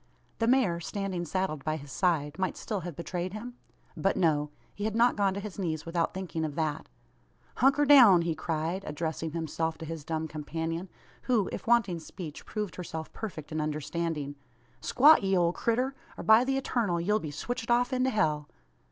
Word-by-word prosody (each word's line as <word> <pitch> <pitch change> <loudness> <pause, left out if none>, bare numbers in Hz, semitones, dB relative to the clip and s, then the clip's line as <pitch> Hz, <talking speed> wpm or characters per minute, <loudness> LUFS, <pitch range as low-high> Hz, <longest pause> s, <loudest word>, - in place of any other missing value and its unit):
The 225 - +2
mare, 235 -9 +3
standing 185 0 -3
saddled 170 -4 -2
by 155 0 -1
his 140 -2 -11
side, 160 -3 0
might 185 -1 -1
still 210 -3 -3
have 175 -3 -6
betrayed 180 +2 -4
him? 235 +4 -6 0.4
But, 195 - +1
no. 150 -4 +2 0.2
He 205 - -4
had 220 0 -1
not 240 +1 +4
gone 195 -2 +1
to - - -2
his 205 0 -7
knees, 160 -4 -2
without 165 0 0
thinking 185 -4 -4
of 150 -2 -3
that. 155 -1 -2 0.7
"Hunker 275 +3 +4
down!" 240 -12 +8
he 165 -1 0
cried, 160 +4 -2
addressing 160 +1 -3
himself 160 0 -2
to 160 - -7
his 160 -1 -6
dumb 160 +1 -2
companion, 165 +3 -4 0.4
who, 220 -7 +3
if - - -6
wanting 225 -7 +3
speech, 160 -1 -9
proved 210 -3 -4
herself 160 -3 -6
perfect 170 -10 -7
in 155 0 -1
understanding. 155 -1 -2 0.5
"Squat, 300 +5 +6
ye 195 -1 +2
ole 170 -1 +3
critter; 250 +6 0 0.2
or - - -6
by 220 +2 +7
the 270 0 +1
Eturnal 215 -10 0
ye'll 210 +5 +1
be 155 - -5
switched 240 - -4
off 245 +2 +3
into 255 +1 +2
hell!" 155 - 0
175 Hz, 185 wpm, -29 LUFS, 160-215 Hz, 0.7 s, down